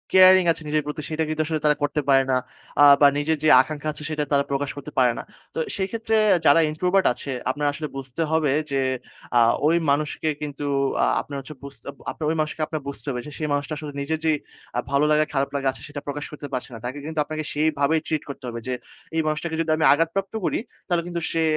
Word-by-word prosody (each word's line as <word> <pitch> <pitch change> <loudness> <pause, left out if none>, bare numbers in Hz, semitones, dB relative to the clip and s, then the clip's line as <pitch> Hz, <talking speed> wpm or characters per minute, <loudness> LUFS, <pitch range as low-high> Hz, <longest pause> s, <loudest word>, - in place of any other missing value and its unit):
Caring 185 -1 +8
আছে 165 - -3
নিজের 150 0 +1
প্রতি 150 +1 -4
সেটা 160 0 -1
কিন্তু 155 0 0
আসলে 155 -1 -1
তারা 150 0 +5
করতে 145 +1 0
পারে 135 -1 +6
না। 130 - +3 0.4
আ - - +9 0.2
বা 145 - +9
নিজের 155 +2 +1
যে, - - +3
আকাঙ্খা 155 +2 -5
আছে 150 - -9
সেটা 155 -1 -1
তারা 140 -1 +4
প্রকাশ 140 0 -1
করতে 140 - -7
পারে 125 -2 +5
না। - - -5 0.3
তো - - -2 0.2
সেই 190 -1 -1
ক্ষেত্রে 225 -1 -1 0.3
যারা 145 +3 +7
introvert 180 +5 +1
আছে 140 - -6 0.2
আপনার 145 +2 -3
আসলে 155 0 -4
বুঝতে 135 +3 -5
হবে 160 -3 +2 0.2
যে, 135 - +1 0.6
আ - - +7 0.3
ঐ - - +6 0.2
মানুষকে 150 +2 0
কিন্তু 145 -1 -5 0.4
আ - - +5 0.2
আপনার 140 -1 -7
হচ্ছে 140 +2 -9
বুঝতে 140 0 -10
আপ - - -21 0.2
আপনার 155 - -5
ঐ - - +2
মানুষকে 155 +1 -3
আপনার 155 -2 -4
বুঝতে 140 - -6
হবে 125 -1 -3
যে, - - -8
সেই 155 - -2
মানুষটা 145 +2 -1
আসলে 150 -2 -6
নিজের 160 +3 -2
যে, 160 - +4 0.5
আ - - +3
ভালো 140 +2 +3
লাগা 155 0 +4
খারাপ 140 -1 +1
লাগা 140 -1 0
আছে - - -13
সেটা 145 -1 -7
প্রকাশ 145 +1 -3
করতে 150 -1 -7
পারছে 130 +1 -3
না। 115 - -7
তাকে 130 +3 -4
কিন্তু 160 0 -3
আপনাকে 155 +1 -4
সেইভাবেই 155 0 +2
ট্রিট 155 -2 -1
করতে 140 - -8
হবে, 115 0 -5
যে, 130 - -1 0.4
এই 165 - +3
মানুষটাকে 160 +2 -2
যদি 165 - -3
আমি 160 - +2
আঘাতপ্রাপ্ত 165 +7 -1
করি - - 0 0.3
তাহলে 175 -2 +1
কিন্তু 170 -1 -3
সে 165 -1 +1
150 Hz, 230 wpm, -24 LUFS, 140-160 Hz, 0.6 s, আ